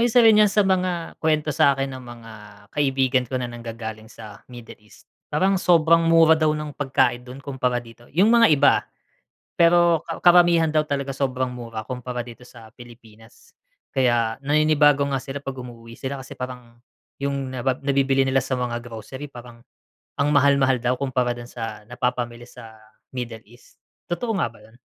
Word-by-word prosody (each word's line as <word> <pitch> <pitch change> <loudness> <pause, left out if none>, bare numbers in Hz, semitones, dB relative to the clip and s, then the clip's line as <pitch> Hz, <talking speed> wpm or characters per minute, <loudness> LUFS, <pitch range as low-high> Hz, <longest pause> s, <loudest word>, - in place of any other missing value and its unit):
isa 245 +1 +4
rin 220 -1 +7
yan 210 -1 +5
sa 210 +1 +3
mga 180 -3 -1
kwento 155 -1 +1
sakin 135 -1 +2
ng 130 - -11
mga 120 -2 -11 0.4
kaibigan 135 -3 +1
ko 130 +1 -4
na 125 - -3
nanggagaling 115 -2 -8
sa 105 -2 -12
Middle 120 -2 -11
East. 105 - -20 0.3
Parang 195 +1 +2
sobrang 165 -2 +4
mura 165 -1 +5
daw 155 -1 +2
ng 150 -1 -6
pagkain 130 -3 0
dun 125 +2 -10
kumpara 130 -3 -2
dito, 120 0 -16
yung 185 +8 +4
mga 235 -1 +6
iba, 145 - +5
ah. - - -24 0.7
Pero 170 -1 +4
ka - - -6
karamihan 175 -2 +5
daw 155 0 +1
talaga 140 -2 -3
sobrang 130 -1 -2
mura 115 -3 -7
kumpara 125 +2 -5
dito 120 +1 -12
sa 115 -3 -15
Pilipinas. 115 -2 -17 0.3
Kaya 120 -4 +1
naninibago 150 -1 +3
nga 135 - 0
sila 135 +2 -7
pag 135 -1 -6
umuuwi 115 -2 -10
sila, 135 0 -5
kasi 130 - -12
parang 125 -2 -8 0.4
yung 140 -1 -3
nabab 130 0 -2
nabibili 135 -1 +2
nila 135 0 +1
sa - - -3
mga 125 -2 -2
grocery 120 +4 -8
parang 120 -3 -13 0.5
ang 145 +1 +1
mahal-mahal 140 -3 +3
daw 125 +1 0
kumpara 125 -3 -1
dun 120 - -8
sa 115 -3 -7
napapamili 120 -1 -3
sa 115 -3 -13 0.4
Middle 120 -3 -6
East. 120 +3 -21 0.3
Totoo 225 +7 -2
nga - - 0
ba 115 - -19
yun? 110 +3 -21
130 Hz, 170 wpm, -23 LUFS, 120-150 Hz, 0.7 s, rin